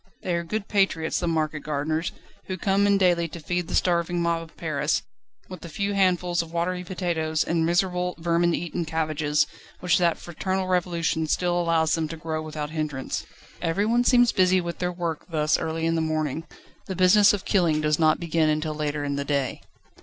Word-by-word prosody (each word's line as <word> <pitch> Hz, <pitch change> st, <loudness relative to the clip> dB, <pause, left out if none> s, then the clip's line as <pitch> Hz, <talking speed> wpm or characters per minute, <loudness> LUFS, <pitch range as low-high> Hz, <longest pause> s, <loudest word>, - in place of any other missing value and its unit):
They 180 Hz, -, -1 dB
are 170 Hz, 0 st, 0 dB
good 200 Hz, +4 st, -4 dB
patriots 195 Hz, -6 st, +1 dB
the 175 Hz, -, -2 dB
market 155 Hz, -2 st, 0 dB
gardeners, 155 Hz, +3 st, -2 dB, 0.4 s
who 185 Hz, -, -3 dB
come 195 Hz, +2 st, +2 dB
in 200 Hz, 0 st, +4 dB
daily 175 Hz, -3 st, +3 dB
to 170 Hz, -, -9 dB
feed 175 Hz, +2 st, -2 dB
the -, -, -3 dB
starving 175 Hz, 0 st, +1 dB
mob 170 Hz, -1 st, 0 dB
of 165 Hz, 0 st, -13 dB
Paris, 155 Hz, -2 st, -1 dB, 0.4 s
with 185 Hz, -2 st, -9 dB
the 170 Hz, -, -8 dB
few 200 Hz, +4 st, -2 dB
handfuls 180 Hz, -2 st, +2 dB
of 165 Hz, -1 st, -9 dB
watery 180 Hz, +2 st, -1 dB
potatoes, 170 Hz, -4 st, -1 dB
and 165 Hz, -1 st, 0 dB
miserable, 180 Hz, 0 st, 0 dB
vermin 170 Hz, +1 st, +1 dB
eaten 175 Hz, 0 st, -3 dB
cabbages, 155 Hz, -2 st, 0 dB, 0.3 s
which 180 Hz, 0 st, +2 dB
that 170 Hz, -2 st, +2 dB
fraternal 185 Hz, +2 st, -3 dB
Revolution 170 Hz, -3 st, 0 dB
still 175 Hz, +2 st, +1 dB
allows 165 Hz, -2 st, +2 dB
them 160 Hz, -1 st, 0 dB
to 165 Hz, +1 st, -7 dB
grow 155 Hz, 0 st, -3 dB
without 155 Hz, -1 st, -5 dB
hindrance. 155 Hz, -4 st, -3 dB, 0.3 s
Everyone 210 Hz, +8 st, +1 dB
seems 245 Hz, -1 st, +5 dB
busy 185 Hz, 0 st, +3 dB
with 170 Hz, -1 st, -5 dB
their 180 Hz, 0 st, -1 dB
work 170 Hz, -3 st, -4 dB
this 155 Hz, -2 st, +1 dB
early 160 Hz, 0 st, -2 dB
in 165 Hz, -, +2 dB
the 165 Hz, -, +1 dB
morning: 155 Hz, 0 st, -2 dB, 0.4 s
the 190 Hz, -, -4 dB
business 185 Hz, +3 st, +6 dB
of 205 Hz, -1 st, -3 dB
killing 170 Hz, -6 st, +2 dB
does 150 Hz, 0 st, +1 dB
not 155 Hz, -1 st, +4 dB
begin 165 Hz, -2 st, +1 dB
until 155 Hz, 0 st, 0 dB
later 150 Hz, -1 st, -2 dB
in 140 Hz, -1 st, -2 dB
the 140 Hz, -, -1 dB
day. 140 Hz, -2 st, -1 dB
170 Hz, 190 wpm, -25 LUFS, 155-180 Hz, 0.4 s, business